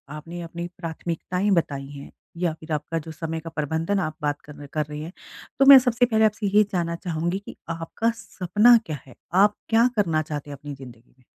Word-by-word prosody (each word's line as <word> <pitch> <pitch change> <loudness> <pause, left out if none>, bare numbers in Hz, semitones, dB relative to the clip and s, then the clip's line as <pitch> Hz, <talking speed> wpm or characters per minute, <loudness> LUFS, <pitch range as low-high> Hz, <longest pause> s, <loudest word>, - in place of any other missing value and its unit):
आपने 165 +3 -7
अपनी 170 +1 -6
प्राथमिकताएँ 175 +3 -3
बताई 140 -4 -1
हैं 140 -1 -10 0.3
या 170 -3 +1
फिर 160 0 -10
आपका 155 +2 -2
जो 160 +1 -9
समय 160 +1 -4
का 165 +1 -8
प्रबंधन 160 +5 -1
आप 155 -4 -2
बात 145 -1 -1
कर 150 - -12
न 145 - -10
कर 150 -2 0
रहे 150 0 -7
हैं, 160 +3 -6 0.5
तो 275 - +6
मैं 275 0 +12
सबसे 245 -1 +2
पहले 220 -2 +3
आपसे 210 -1 0
ये 210 - +8
जानना 170 -2 -1
चाहूँगी 170 +1 -2
कि 200 - -11
आपका 165 +8 -1
सपना 215 +2 +4
क्या 155 -2 -4
है? 125 - -14 0.2
आप 205 +3 +5
क्या 230 +2 +5
करना 165 -7 +2
चाहते 150 -1 -6
हैं 140 - -7
अपनी 145 +1 -8
ज़िन्दगी 125 -3 -14
में? 125 - -26
165 Hz, 210 wpm, -24 LUFS, 150-200 Hz, 0.5 s, मैं